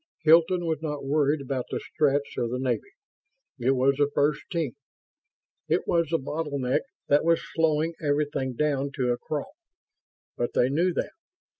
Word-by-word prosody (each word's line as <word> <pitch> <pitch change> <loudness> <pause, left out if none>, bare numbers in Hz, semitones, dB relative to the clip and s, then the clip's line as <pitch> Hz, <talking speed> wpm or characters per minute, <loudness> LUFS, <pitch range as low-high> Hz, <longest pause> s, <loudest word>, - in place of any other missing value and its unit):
Hilton 170 +3 +5
was 160 -2 -1
not 150 -3 -4
worried 145 +1 +2
about 130 -2 -3
the - - -2
Stretts 145 -1 0
or 120 - 0
the 125 +2 -3
Navy. 130 - -2 0.7
It 130 +3 +2
was 135 +1 +3
the 145 -1 +3
First 145 0 +2
Team. 165 -8 -1 0.9
It - - 0
was 170 -1 +2
the 165 - +2
bottleneck 140 -3 -1 0.3
that 145 +1 +4
was 165 0 +3
slowing 160 0 +1
everything 145 -3 0
down 140 0 0
to 125 -4 0
a 120 - 0
crawl... 150 - -4 0.8
but 120 - -2
they 125 - +3
knew 170 +6 +2
that. - - -2
145 Hz, 160 wpm, -26 LUFS, 135-160 Hz, 0.9 s, Hilton